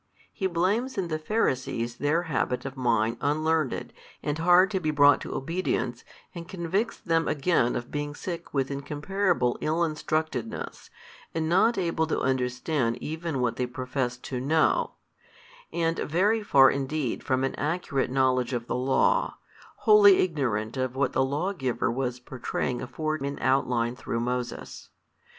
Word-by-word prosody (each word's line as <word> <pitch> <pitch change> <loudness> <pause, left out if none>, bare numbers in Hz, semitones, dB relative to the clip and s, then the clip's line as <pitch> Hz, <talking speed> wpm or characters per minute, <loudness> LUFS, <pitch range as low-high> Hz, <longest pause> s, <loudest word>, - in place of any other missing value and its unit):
He 190 - -1
blames 200 +9 0
in 185 -3 -1
the 155 -1 -2
Pharisees 130 - -1
their 155 +4 +1
habit 130 -5 -1
of 135 0 -5
mind 115 -3 +1
unlearned 155 -1 0 0.3
and 145 +1 -1
hard 180 +3 +5
to 190 - 0
be 155 -4 -1
brought 145 -1 +5
to - - -5
obedience 135 -5 -2 0.3
and 170 -1 -8
convicts 190 +5 -2
them 165 -2 0
again 140 -4 +1
of 120 - -5
being 145 0 -3
sick 170 +1 -6
with 135 -1 -1
incomparable 150 0 0
ill 160 +2 0
instructedness 155 -6 -3 0.5
and 160 -1 0
not 190 +8 +3
able 165 -3 0
to - - 0
understand 125 0 0
even 160 -3 -3
what 120 -2 0
they 125 - -1
professed 125 0 -3
to 125 - -4
know, 155 +4 +2 0.8
and 165 -1 0
very 205 +8 +2
far 135 -10 +6
indeed 140 -1 -2
from 130 0 0
an 135 - 0
accurate 150 -3 -1
knowledge 130 -1 +1
of 120 -1 -2
the - - -3
law, 135 - +2 0.5
wholly 205 -3 +8
ignorant 125 - -1
of 130 -1 -2
what 135 0 0
the - - +3
Lawgiver 140 -3 -1
was 125 0 -2
pourtraying 125 0 -3
afore 155 +4 -2
in 140 0 -4
outline 125 -2 +1
through 115 - -3
Moses. 125 0 -4
145 Hz, 150 wpm, -27 LUFS, 125-170 Hz, 0.8 s, wholly